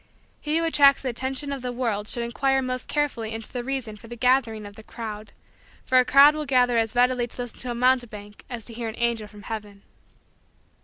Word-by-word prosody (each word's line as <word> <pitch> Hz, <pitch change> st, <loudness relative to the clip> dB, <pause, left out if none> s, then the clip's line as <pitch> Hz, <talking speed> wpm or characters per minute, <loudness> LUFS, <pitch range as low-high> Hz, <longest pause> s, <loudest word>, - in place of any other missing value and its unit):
He 305 Hz, +1 st, -1 dB
who 330 Hz, -, +1 dB
attracts 280 Hz, -4 st, +5 dB
the 260 Hz, -, -1 dB
attention 265 Hz, +4 st, -3 dB
of 275 Hz, -, -6 dB
the 250 Hz, 0 st, -3 dB
world 230 Hz, -4 st, -2 dB
should 235 Hz, -, 0 dB
inquire 270 Hz, +3 st, +1 dB
most 255 Hz, 0 st, -3 dB
carefully 265 Hz, -7 st, -1 dB
into 225 Hz, 0 st, -3 dB
the 245 Hz, -1 st, -3 dB
reason 250 Hz, -5 st, -4 dB
for 230 Hz, -, -14 dB
the 240 Hz, -, -8 dB
gathering 240 Hz, -3 st, +1 dB
of 205 Hz, 0 st, -11 dB
the -, -, -11 dB
crowd; 215 Hz, -1 st, -8 dB, 0.5 s
for 255 Hz, -, +4 dB
a 250 Hz, -, +4 dB
crowd 280 Hz, +3 st, +7 dB
will 305 Hz, -1 st, -4 dB
gather 245 Hz, -3 st, +3 dB
as 225 Hz, +1 st, -1 dB
readily 245 Hz, 0 st, +2 dB
to -, -, -11 dB
listen 245 Hz, -1 st, -6 dB
to 250 Hz, -, -4 dB
a 240 Hz, -, -2 dB
mountebank 235 Hz, -5 st, 0 dB
as 240 Hz, -4 st, -6 dB
to 235 Hz, -, -9 dB
hear 230 Hz, 0 st, -4 dB
an 220 Hz, -, -8 dB
angel 235 Hz, -3 st, -1 dB
from 210 Hz, -1 st, -14 dB
heaven. 205 Hz, -2 st, -7 dB
240 Hz, 220 wpm, -25 LUFS, 225-260 Hz, 0.5 s, crowd